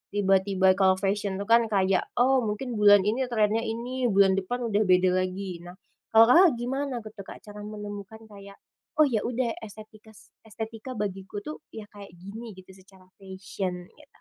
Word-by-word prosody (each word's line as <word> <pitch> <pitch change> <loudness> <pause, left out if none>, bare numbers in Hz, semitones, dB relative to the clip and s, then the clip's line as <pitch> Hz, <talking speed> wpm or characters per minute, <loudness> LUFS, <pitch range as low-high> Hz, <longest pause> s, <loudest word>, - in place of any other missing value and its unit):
tiba-tiba 190 -1 +3
kalau 190 -1 +4
fashion 200 0 -1
itu 200 - -4
kan 230 -1 +5
kayak, 190 -3 +1
oh 260 +2 +3
mungkin 220 +1 -4
bulan 205 -2 +6
ini 235 +5 0
trennya 220 -2 +1
ini 240 +3 -3
bulan 195 -2 +4
depan 245 +7 -4
udah 205 +1 +2
beda 185 0 +4
lagi, 185 -1 -4
nah 175 +1 -12 0.4
kalau 225 +2 +8
Kakak 360 +4 +7
gimana 265 +3 -3
gitu 215 - -10
tuh 200 - -8
Kak - - -10
cara 210 0 -11
menemukan 210 +1 -8
kayak, 200 -2 -13 0.4
oh 310 - +5
ya 245 -7 +1
udah 240 -1 -1
estetika 215 0 -13 0.4
es 215 - -17 0.4
bagiku 195 -1 -5
tuh 305 - -7 0.2
ya 220 - -7
kayak 200 -4 -13
gini 205 +4 -10
gitu 185 0 -15
secara 190 -1 -20
fashion 190 -1 -5 0.2
gitu? 300 -1 -21
205 Hz, 175 wpm, -26 LUFS, 190-230 Hz, 0.4 s, kalau